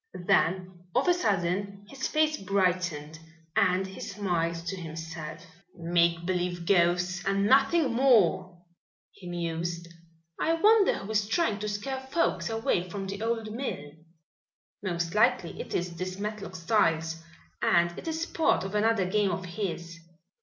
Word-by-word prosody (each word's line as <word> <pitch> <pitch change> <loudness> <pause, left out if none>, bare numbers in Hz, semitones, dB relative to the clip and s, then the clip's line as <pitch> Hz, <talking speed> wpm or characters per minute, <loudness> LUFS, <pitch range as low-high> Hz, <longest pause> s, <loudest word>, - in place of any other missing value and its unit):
Then 180 +1 +1 0.2
of - - +2
a 355 - +6
sudden 200 - -1
his 265 +4 -4
face 310 0 +2
brightened 180 - -1 0.4
and 185 +1 +3
he 190 0 -9
smiled 175 -4 -1
to 185 +3 -3
himself. 160 -1 -7 0.3
"Make 170 0 +1
believe 180 -1 -2
ghosts 180 0 +2
and 195 0 +1
nothing 270 +3 +4
more," 190 -8 +3 0.5
he 180 - -11
mused. 170 0 -3 0.5
"I 325 - +2
wonder 420 +4 +5
who 195 - -6
is 210 -1 +1
trying 225 - +1
to 210 +1 -3
scare 235 +6 -3
folks 265 - -1
away 225 -5 0
from 195 +2 -5
the 200 +1 -5
old 225 -1 -2
mill? 220 - -4 0.9
Most 170 -3 -2
likely 210 -5 +2
it - - -6
is 175 -1 -2
this 185 +1 -4
Matlock 205 -2 -5
Styles 165 -3 +1 0.4
and 175 0 +3
it - - -9
is 325 +1 -1
part 325 - +1
of 190 +1 -5
another 210 -2 +2
game 200 +2 +1
of 185 +1 -3
his. 170 -2 -5
185 Hz, 145 wpm, -28 LUFS, 170-215 Hz, 0.9 s, a